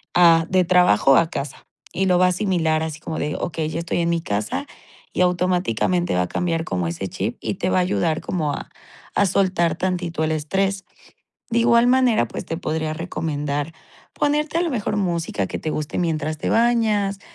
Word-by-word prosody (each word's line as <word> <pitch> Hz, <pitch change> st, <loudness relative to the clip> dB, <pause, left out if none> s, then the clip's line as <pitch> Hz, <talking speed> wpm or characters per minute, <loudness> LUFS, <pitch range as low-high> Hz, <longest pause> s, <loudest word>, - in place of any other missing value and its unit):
a 165 Hz, -2 st, +6 dB
de 185 Hz, -1 st, +3 dB
trabajo 170 Hz, -, +4 dB
a 165 Hz, -1 st, +3 dB
casa, 140 Hz, -3 st, -5 dB, 0.3 s
y 190 Hz, +2 st, 0 dB
lo 180 Hz, -1 st, +4 dB
va 185 Hz, -, +4 dB
a -, -, +4 dB
asimilar 175 Hz, -4 st, +1 dB
así 160 Hz, -1 st, -4 dB
como 160 Hz, 0 st, -5 dB
de: 150 Hz, +1 st, -2 dB
"Okey, 160 Hz, -2 st, -2 dB
ya 160 Hz, -, -4 dB
estoy 170 Hz, +1 st, -2 dB
en 170 Hz, 0 st, +1 dB
mi 170 Hz, -1 st, 0 dB
casa", 105 Hz, -9 st, -2 dB, 0.5 s
y -, -, 0 dB
automáticamente 180 Hz, -, +1 dB
va 90 Hz, -, +2 dB
a -, -, -4 dB
cambiar 165 Hz, -, -1 dB
como 90 Hz, -, -2 dB
ese 85 Hz, +3 st, -4 dB
chip 105 Hz, +5 st, -4 dB
y -, -, -2 dB
te 185 Hz, -, -1 dB
va -, -, +2 dB
a 185 Hz, -, +4 dB
ayudar 170 Hz, -3 st, 0 dB
como 155 Hz, -5 st, -2 dB
a -, -, -6 dB, 0.4 s
a 205 Hz, -, +3 dB
soltar 180 Hz, -3 st, +1 dB
tantito 175 Hz, -3 st, -2 dB
el 155 Hz, -, 0 dB
estrés. 195 Hz, +6 st, -1 dB, 0.7 s
De 235 Hz, 0 st, +2 dB
igual 235 Hz, 0 st, +4 dB
manera, 250 Hz, -, +3 dB
pues -, -, -7 dB
te 165 Hz, -, -3 dB
podría 155 Hz, -2 st, -2 dB
recomendar 150 Hz, -3 st, -3 dB, 0.4 s
ponerte 300 Hz, +2 st, 0 dB
a -, -, +2 dB
lo 340 Hz, -, -1 dB
mejor 215 Hz, -5 st, -2 dB
música 170 Hz, -, -1 dB
que -, -, -5 dB
te 155 Hz, -, -3 dB
guste 155 Hz, -1 st, -3 dB
mientras 155 Hz, -3 st, -1 dB
te -, -, -2 dB
bañas, 220 Hz, -4 st, +2 dB
170 Hz, 195 wpm, -22 LUFS, 155-190 Hz, 0.7 s, a